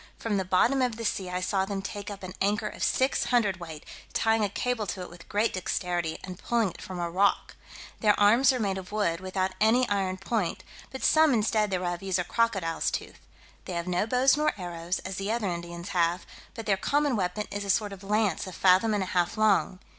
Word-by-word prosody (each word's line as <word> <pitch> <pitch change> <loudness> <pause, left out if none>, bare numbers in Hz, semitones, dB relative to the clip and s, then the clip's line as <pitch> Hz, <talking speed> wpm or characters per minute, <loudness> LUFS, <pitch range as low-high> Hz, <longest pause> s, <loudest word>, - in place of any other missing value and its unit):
From 215 -3 -1
the 190 - 0
bottom 230 +9 +3
of 250 -3 +1
the 230 0 -5
sea 195 -4 -1
I 180 0 -2
saw 190 +1 +1
them 195 0 -4
take 205 0 -6
up 200 -1 -8
an 185 0 -6
anchor 205 +2 +1
of - - -9
six 260 +1 +2
hundredweight, 185 -10 -1 0.3
tying 225 -1 +2
a 205 - +1
cable 225 +1 -2
to 185 - -4
it 180 - -10
with 175 -1 -14
great 210 +3 +1
dexterity, 175 -3 -2
and 185 -1 -8
pulling 230 -5 +1
it - - -13
from 185 -1 -7
a 170 - -1
rock. 190 +4 +1 0.4
Their 210 -2 +3
arms 230 +6 +6
are 255 - -2
made 195 -3 -1
of 185 0 -11
wood, 185 -6 0
without 185 0 -2
any 235 +3 +4
iron 190 -2 0
point; 195 -1 -2 0.3
but 265 - -7
some 310 -4 +5
instead 215 -1 +1
thereof 180 -2 -2
use 190 -1 0
a 180 - 0
crocodile's 190 -5 0
tooth. - - -5 0.5
They 185 - -5
have 170 0 -2
no 180 +4 0
bows 255 +3 +4
nor 300 +1 +1
arrows, 175 -1 -3
as 190 0 -4
the 195 +2 -2
other 225 -4 -1
Indians 170 +1 -6
have, 175 0 +1 0.3
but 225 - -6
their 195 -3 +2
common 285 +5 +1
weapon 195 +1 -1
is 205 0 -3
a 200 - -6
sort 205 +1 +1
of 195 0 -11
lance 205 -3 0
a 185 - -7
fathom 190 +5 +4
and 200 - 0
a 185 - -6
half 175 +1 +1
long. 210 -3 +3
195 Hz, 220 wpm, -28 LUFS, 180-220 Hz, 0.5 s, arms